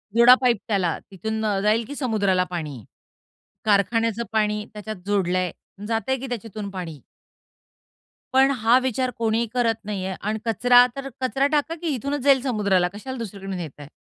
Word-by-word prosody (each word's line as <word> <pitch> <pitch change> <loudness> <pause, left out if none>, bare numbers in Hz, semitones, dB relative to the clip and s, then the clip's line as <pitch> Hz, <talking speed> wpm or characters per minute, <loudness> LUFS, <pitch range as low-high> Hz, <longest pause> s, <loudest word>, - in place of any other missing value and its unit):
जोडा 235 +2 +9
पाईप 245 -3 +3
त्याला, 190 -6 0
तिथून 220 +3 -3
अ, 205 -2 +1
जाईल 215 +3 +2
की 285 - -7
समुद्राला 205 -9 +1
पाणी. 150 -9 -5 0.8
कारखान्याचं 225 +2 +2
पाणी 210 -1 +1
त्याच्यात 215 +1 -6
जोडलं 190 -3 +1
आहे, 180 -2 0 0.4
जातं 225 +2 -1
आहे 265 - +1
की 270 - -6
त्याच्यातून 220 -4 -5
पाणी. 170 -7 -7 1.3
पण 265 +1 +5
हा 230 +2 +4
विचार 260 0 -1
कोणीही 230 0 +1
करत 240 -2 +2
नाही 200 -3 -3
आहे 190 0 -3
आणि 215 +2 -2
कचरा 245 +2 +5
तर 275 0 -5
कचरा 270 +2 +1
टाका 305 +2 +1
की 340 - -3
इथूनच 280 +4 -3
जाईल 275 -2 +5
समुद्राला. 200 -8 +1
कशाला 260 +6 -7
दुसरीकडून 195 -4 -6
नेताय? 150 -4 -8
220 Hz, 165 wpm, -23 LUFS, 195-250 Hz, 1.3 s, जोडा